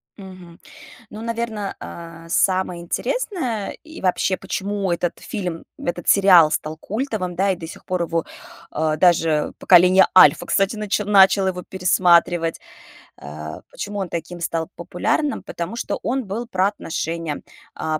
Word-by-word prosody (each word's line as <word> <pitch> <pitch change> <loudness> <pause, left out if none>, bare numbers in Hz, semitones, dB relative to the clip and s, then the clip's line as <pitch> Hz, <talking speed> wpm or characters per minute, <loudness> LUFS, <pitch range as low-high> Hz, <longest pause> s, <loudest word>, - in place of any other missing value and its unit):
Мгм. 185 -4 -12 0.5
Ну, 215 - -8
наверно, 230 -3 -4
а, 165 0 -10
самое 185 0 +1
интересное 255 - -2
и 315 0 -11
вообще, 185 0 +1
почему 195 0 -3
этот 170 0 -2
фильм, 180 -6 -5
этот 175 0 -4
сериал 185 -6 +7
стал 155 0 -3
культовым, 210 - -3
да, 195 +2 +2
и 185 - -1
до 165 -1 -8
сих - - -12
пор 180 -1 -1
его, 165 0 -2 0.5
а, 155 0 0
даже 165 -3 +3
поколение 180 +1 +6
Альфа, - - +7
кстати, 195 +2 +1
начи 210 -1 -1
начало 195 -1 +5
его 180 -1 -4
пересматривать, 175 -2 +2 0.6
э, 75 +2 -8
почему 205 0 -6
он 190 -3 -3
таким 170 +1 -5
стал 165 -1 -2
популярным, 180 - -1
потому 170 +6 -5
что 235 - -3
он 260 0 -2
был 225 +5 -5
про 190 -3 +1
отношения, 165 -5 -4 0.3
а, 155 -1 -2
185 Hz, 145 wpm, -21 LUFS, 170-205 Hz, 0.6 s, сериал